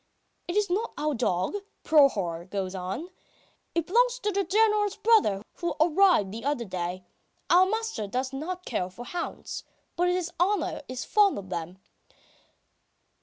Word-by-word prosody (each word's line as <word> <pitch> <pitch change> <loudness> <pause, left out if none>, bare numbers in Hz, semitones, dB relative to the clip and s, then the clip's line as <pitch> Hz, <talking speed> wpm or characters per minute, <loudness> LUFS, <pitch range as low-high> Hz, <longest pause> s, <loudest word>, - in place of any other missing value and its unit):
"It 345 - -3
is 420 -1 +3
not 415 +6 -1
our 300 0 0
dog," 225 - 0 0.3
Prohor 195 - +3
goes 190 -2 -3
on. 190 - -4 0.7
"It 335 -2 +1
belongs 485 +6 +3
to 420 -4 -1
the 395 0 +1
General's 420 +1 +2
brother, 420 - +3
who 345 -1 -2
arrived 330 - +4
the 225 +2 -7
other 280 -4 -1
day. 180 -1 -4 0.5
Our 365 +2 +7
master 445 - -2
does 260 +5 -2
not 360 +6 -5
care 180 - -2
for 235 +7 -10
hounds. 345 +6 -5 0.3
But 355 +1 +2
his 360 -1 -1
honour 385 -2 +1
is 255 -1 -4
fond 415 -2 +4
of 195 -2 -7
them. 175 +1 -4
320 Hz, 150 wpm, -27 LUFS, -, 0.7 s, Our